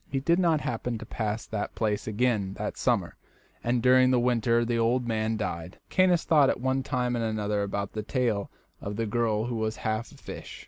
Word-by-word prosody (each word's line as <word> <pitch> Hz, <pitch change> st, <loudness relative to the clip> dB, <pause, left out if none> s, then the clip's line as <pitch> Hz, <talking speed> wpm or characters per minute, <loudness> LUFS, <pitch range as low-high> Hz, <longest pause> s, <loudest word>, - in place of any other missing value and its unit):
He 135 Hz, -, -1 dB
did 170 Hz, +6 st, +2 dB
not 165 Hz, -4 st, +3 dB
happen 120 Hz, 0 st, -2 dB
to -, -, -8 dB
pass 110 Hz, 0 st, -3 dB
that 105 Hz, -2 st, -4 dB
place 105 Hz, -2 st, -1 dB
again 110 Hz, -3 st, 0 dB
that -, -, -4 dB
summer, -, -, 0 dB, 0.5 s
and 120 Hz, 0 st, +1 dB
during 130 Hz, 0 st, +6 dB
the 130 Hz, -1 st, +3 dB
winter 120 Hz, -1 st, +2 dB
the 115 Hz, 0 st, 0 dB
old 120 Hz, +2 st, +1 dB
man 110 Hz, -1 st, 0 dB
died. 90 Hz, -3 st, -4 dB
Caius 185 Hz, -3 st, +4 dB
thought 150 Hz, -4 st, +5 dB
at -, -, 0 dB
one 130 Hz, +1 st, 0 dB
time 125 Hz, -2 st, -1 dB
and 115 Hz, -, -1 dB
another 105 Hz, -2 st, -1 dB
about 100 Hz, 0 st, -3 dB
this 110 Hz, -1 st, -4 dB
tale 115 Hz, -6 st, 0 dB, 0.3 s
of 100 Hz, +1 st, -4 dB
the 115 Hz, +2 st, -1 dB
girl 110 Hz, -1 st, 0 dB
who 120 Hz, -1 st, -3 dB
was 110 Hz, 0 st, -1 dB
half 110 Hz, +1 st, -3 dB
a -, -, -15 dB
fish. -, -, -9 dB
115 Hz, 210 wpm, -27 LUFS, 110-125 Hz, 0.5 s, during